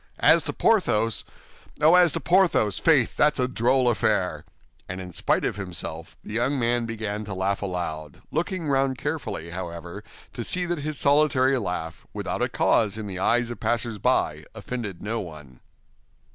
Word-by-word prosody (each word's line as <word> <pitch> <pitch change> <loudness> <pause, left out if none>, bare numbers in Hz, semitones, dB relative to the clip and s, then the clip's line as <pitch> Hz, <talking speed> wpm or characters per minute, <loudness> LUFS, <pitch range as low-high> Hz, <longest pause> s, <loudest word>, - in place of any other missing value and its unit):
As - - +6
to - - -2
Porthos—oh, 155 - +1
as 180 -2 +6
to - - -1
Porthos, 175 - +2
faith, 145 -7 +3
that's 150 -2 +3
a 125 - +2
droll 125 +1 +2
affair!" 105 -9 0 0.4
And 90 +1 -5
in 90 -1 -8
spite 85 - +1
of - - -2
himself, 85 -3 -6
the - - -8
young 125 +5 +1
man 120 -1 +1
began 110 -2 -4
to 100 -2 -5
laugh 95 +1 -1
aloud, 85 -6 -4
looking 170 +1 -2
round 135 -2 +1
carefully, 110 - -4
however, 85 +2 -7 0.3
to 120 - -5
see 180 +9 0
that 175 -2 -2
his 150 0 -3
solitary 140 -2 +3
laugh, 90 -5 -5
without - - -3
a - - +1
cause 105 -1 +2
in 110 - -5
the 95 -2 -5
eyes 120 +4 +2
of 120 - -7
passers 115 -2 -1
by, 80 -12 +1
offended 110 -4 -6
no 115 +3 -2
one. 75 -8 -10
115 Hz, 165 wpm, -25 LUFS, 95-135 Hz, 0.4 s, As